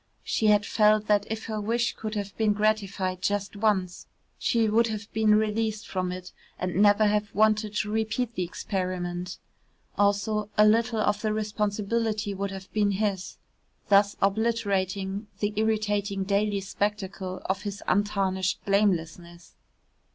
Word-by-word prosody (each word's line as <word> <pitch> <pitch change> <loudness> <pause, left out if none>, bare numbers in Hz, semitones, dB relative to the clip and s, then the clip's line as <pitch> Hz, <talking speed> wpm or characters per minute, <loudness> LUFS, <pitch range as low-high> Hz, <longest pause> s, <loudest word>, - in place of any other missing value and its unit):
She 220 - 0
had 205 -1 +4
felt 215 0 +3
that 205 -1 +2
if 220 0 -4
her 215 -1 -3
wish 230 +3 0
could 215 0 -5
have 200 -1 -4
been 215 -2 +2
gratified 200 -3 0
just 205 +1 -1
once, 200 -4 0 0.3
she 230 -2 +2
would 230 +2 +3
have 215 -1 -6
been 215 -1 +4
released 215 0 0
from 185 -1 -2
it 180 0 -7 0.3
and 180 -1 -3
never 205 +1 +5
have 210 0 0
wanted 215 0 +2
to 210 0 -1
repeat 220 +2 -1
the 185 - -3
experiment. 180 0 -3 0.6
Also 205 +1 +1
a 210 - +7
little 225 +1 +3
of 210 0 +1
the 215 - 0
responsibility 210 0 -1
would 200 +1 -3
have 190 -1 -9
been 205 -2 +2
his 195 -2 -2 0.5
thus 200 0 +5
obliterating 200 -2 0
the 205 0 -1
irritating 210 -2 0
daily 200 +1 0
spectacle 195 -1 -3
of 190 0 -1
his 205 -1 -6
untarnished 190 -2 0
blamelessness. 175 -4 -1
205 Hz, 145 wpm, -27 LUFS, 195-215 Hz, 0.6 s, a